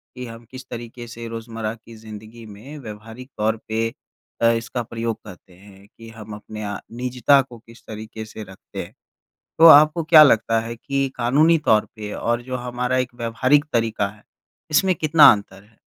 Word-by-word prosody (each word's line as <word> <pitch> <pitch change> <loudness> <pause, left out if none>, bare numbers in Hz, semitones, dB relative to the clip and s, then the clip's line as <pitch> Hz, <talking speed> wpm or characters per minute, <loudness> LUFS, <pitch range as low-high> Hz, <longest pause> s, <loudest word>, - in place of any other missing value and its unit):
कि 125 0 -7
हम 115 0 -11
किस 130 0 -10
तरीके 120 0 -8
से 115 0 -8
रोज़मर्रा 115 -1 -5
की 115 0 -16
ज़िंदगी 110 +1 -12
में 110 +9 -11
व्यावहारिक 115 +2 -10
तौर 110 +1 0
पे 115 +1 -1 0.5
अ, 115 - +5
इसका 115 +2 -3
प्रयोग 115 -1 -4
करते 95 -2 -14
हैं, 100 +2 -18
कि 115 0 -12
हम 110 -2 -11
अपने 105 +1 -9 0.3
निजता 125 +2 +3
को 125 -3 -12
किस 115 +1 -18
तरीके 110 0 -8
से 110 0 -9
रखते 95 -2 -9
हैं, - - -14 0.7
तो 165 - +8
आपको 155 +2 +7
क्या 155 -1 +8
लगता 115 -4 +3
है 115 +1 -7
कि 135 +2 -2
कानूनी 150 +7 +3
तौर 110 -1 +3
पे 105 -1 -7
और 120 +1 -2
जो 130 +1 -5
हमारा 125 +1 -3
एक 125 -1 -3
व्यावहारिक 125 +5 +1
तरीका 115 -3 0
है, 105 +1 -16 0.5
इसमें 185 +5 +3
कितना 155 -2 +6
अंतर 100 -2 -7
है? 110 +1 -28
115 Hz, 175 wpm, -21 LUFS, 110-125 Hz, 0.7 s, तो